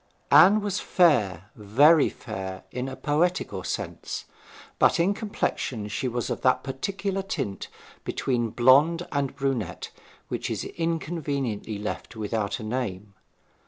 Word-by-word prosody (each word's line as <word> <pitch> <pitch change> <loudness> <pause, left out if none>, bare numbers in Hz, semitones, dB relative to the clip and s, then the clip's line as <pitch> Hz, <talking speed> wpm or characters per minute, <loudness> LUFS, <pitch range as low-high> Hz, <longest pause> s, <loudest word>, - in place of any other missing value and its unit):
Anne 200 +6 +7
was 205 -1 -1
fair, 105 - +2
very 140 +9 +5
fair, 95 -4 -7
in 125 +1 -3
a 130 - -6
poetical 170 +6 0
sense; - - -4 0.5
but - - +4
in 180 +4 +3
complexion 135 - -3
she 105 +5 -2
was 120 -1 -2
of - - -3
that 130 0 +3
particular 195 +8 -3
tint 135 - -4 0.4
between 120 -3 -1
blonde 145 +9 +4
and 140 -2 -1
brunette 135 -10 -2 0.4
which - - -3
is - - -2
inconveniently 145 -10 -3
left 105 +4 -5
without 105 -2 -2
a - - -7
name. 105 -4 -4
130 Hz, 125 wpm, -26 LUFS, 110-165 Hz, 0.5 s, Anne